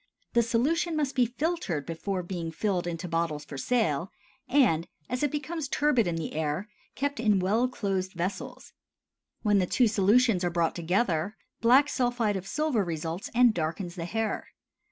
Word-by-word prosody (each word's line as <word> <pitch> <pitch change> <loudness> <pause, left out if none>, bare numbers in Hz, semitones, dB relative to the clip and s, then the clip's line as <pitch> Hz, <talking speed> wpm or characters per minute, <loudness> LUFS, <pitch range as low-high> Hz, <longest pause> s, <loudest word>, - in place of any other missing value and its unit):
The 235 - +5
solution 285 +9 +1
must 290 -3 0
be 250 -2 +3
filtered 250 - -2
before 180 +3 -3
being 175 -2 -4
filled 180 0 -1
into 175 +1 -4
bottles 165 -3 -1
for 145 - -9
sale, 170 - 0 0.4
and, 205 - +3 0.2
as 250 - -1
it 295 - +2
becomes 300 +2 -3
turbid 285 -7 +2
in 170 - -1
the 165 -1 -4
air, 155 +5 -2 0.3
kept 285 -2 -2
in 215 -3 +3
well 215 +7 +2
closed 195 -6 -2
vessels. 180 +2 -5 0.7
When 205 -2 +4
the 180 - +1
two 245 +5 +3
solutions 210 0 +3
are 175 - +2
brought 170 -1 +1
together, 180 +1 0 0.2
black 255 +5 +5
sulphide 245 -6 0
of 190 0 -5
silver 300 -4 +1
results 165 +1 -4
and 245 -2 +6
darkens 170 +1 -3
the 170 -2 -5
hair. 225 +4 -2
200 Hz, 165 wpm, -28 LUFS, 170-250 Hz, 0.7 s, and